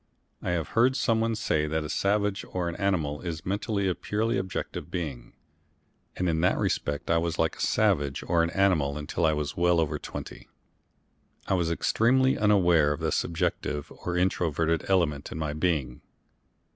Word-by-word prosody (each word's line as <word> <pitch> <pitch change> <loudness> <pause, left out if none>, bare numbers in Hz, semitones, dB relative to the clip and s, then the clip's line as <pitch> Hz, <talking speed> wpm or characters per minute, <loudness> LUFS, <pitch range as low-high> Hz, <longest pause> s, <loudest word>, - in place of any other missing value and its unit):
I - - -3
have 85 -3 -1
heard 125 +3 +3
someone 115 -3 +1
say 80 -8 0
that 80 +1 -1
a - - -4
savage 100 +4 0
or 90 -2 -2
an 85 - -3
animal 85 -8 0
is 80 -3 -5
mentally 100 +1 -1
a 90 - +2
purely 110 +5 -1
objective 95 0 -5
being, 70 -9 -5 0.8
and 90 - -1
in 80 -1 +1
that 90 - +3
respect 75 +3 -1
I 85 - +4
was 85 -1 -2
like - - +1
a - - -7
savage 70 -2 +1
or 85 -1 +2
an 85 - +1
animal 85 -7 +2
until 75 +2 0
I 80 - +2
was 75 -1 -3
well 85 0 +3
over 80 -3 0
twenty. - - -8 1.0
I - - 0
was 85 -3 +1
extremely 130 +9 +2
unaware 90 -8 +4
of 75 - -7
the - - -1
subjective 75 -3 -2
or 90 0 -4
introverted 85 -3 +1
element 80 -7 +1
in - - -5
my 75 -2 -2
being. 75 -6 -1
85 Hz, 170 wpm, -27 LUFS, 75-100 Hz, 1.0 s, I